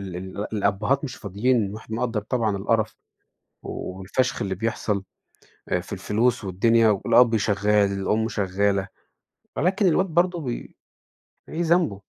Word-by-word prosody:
ال 95 Hz, +3 st, -5 dB
الأبّهات 105 Hz, +9 st, +1 dB
مش 130 Hz, -3 st, -5 dB
فاضيين 105 Hz, +1 st, 0 dB
وإحنا 110 Hz, +1 st, -6 dB
نقدَّر 115 Hz, -3 st, -1 dB
طبعًا 110 Hz, -2 st, -1 dB
القَرَف 110 Hz, +2 st, 0 dB, 0.7 s
و 95 Hz, -, -6 dB
والفَشْخ 125 Hz, +7 st, -1 dB
اللي 95 Hz, -2 st, -1 dB
بيحصل 105 Hz, -1 st, -2 dB, 0.7 s
آآ -, -, +1 dB
في -, -, -9 dB
الفلوس 115 Hz, +2 st, 0 dB
والدنيا 115 Hz, +4 st, +3 dB
والأب 115 Hz, +3 st, +4 dB
شغّال، 105 Hz, -1 st, +2 dB
الأم 105 Hz, +3 st, 0 dB
شغّالة، 100 Hz, -1 st, 0 dB, 0.7 s
ولكن 190 Hz, +5 st, +2 dB
الواد 185 Hz, +3 st, +3 dB
برضه 175 Hz, 0 st, +1 dB
بي 125 Hz, -5 st, -5 dB, 0.7 s
إيه 165 Hz, +2 st, -2 dB
ذنبه؟ 170 Hz, -, +2 dB
110 Hz, 130 wpm, -24 LUFS, 100-125 Hz, 0.7 s, والأب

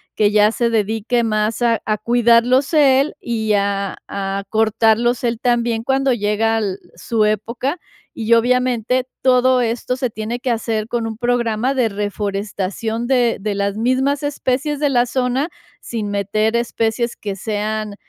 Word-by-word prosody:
que 210 Hz, -1 st, +3 dB
ya 210 Hz, +1 st, +4 dB
se 235 Hz, 0 st, +1 dB
dedique 225 Hz, +2 st, 0 dB
más 215 Hz, +1 st, -1 dB
a 230 Hz, -2 st, +2 dB
a 215 Hz, -1 st, 0 dB
cuidarlos 240 Hz, +5 st, +3 dB
él, 280 Hz, -1 st, +4 dB
y, 220 Hz, -2 st, -2 dB
a 200 Hz, -1 st, -1 dB
a 195 Hz, 0 st, -3 dB
cortarlos 225 Hz, +2 st, +2 dB
él 230 Hz, -1 st, -1 dB
también 235 Hz, -2 st, +1 dB
cuando 270 Hz, +1 st, +1 dB
llega 220 Hz, 0 st, 0 dB
al 200 Hz, -3 st, -2 dB, 0.2 s
su 225 Hz, -2 st, 0 dB
época. 235 Hz, -, -1 dB, 0.4 s
Y 230 Hz, 0 st, 0 dB
obviamente 250 Hz, +1 st, +1 dB
todo 255 Hz, 0 st, +4 dB
esto 240 Hz, +1 st, -1 dB
se 255 Hz, -2 st, -1 dB
tiene 220 Hz, +2 st, -4 dB
que 250 Hz, -, -3 dB
hacer 225 Hz, -1 st, -2 dB
con 235 Hz, -1 st, -2 dB
un 220 Hz, -1 st, -5 dB
programa 240 Hz, +1 st, 0 dB
de 250 Hz, -4 st, +1 dB
reforestación 205 Hz, +2 st, -3 dB
de 245 Hz, -4 st, +2 dB
de 210 Hz, -1 st, -2 dB
las 200 Hz, 0 st, -1 dB
mismas 260 Hz, +5 st, 0 dB
especies 285 Hz, 0 st, -1 dB
de 290 Hz, -, +2 dB
la 245 Hz, -2 st, +3 dB
zona, 255 Hz, +5 st, -1 dB, 0.3 s
sin 220 Hz, -3 st, -4 dB
meter 215 Hz, +3 st, 0 dB
especies 235 Hz, 0 st, -1 dB
que 200 Hz, -2 st, -5 dB
sean, 215 Hz, 0 st, -3 dB
230 Hz, 155 wpm, -19 LUFS, 215-250 Hz, 0.4 s, ya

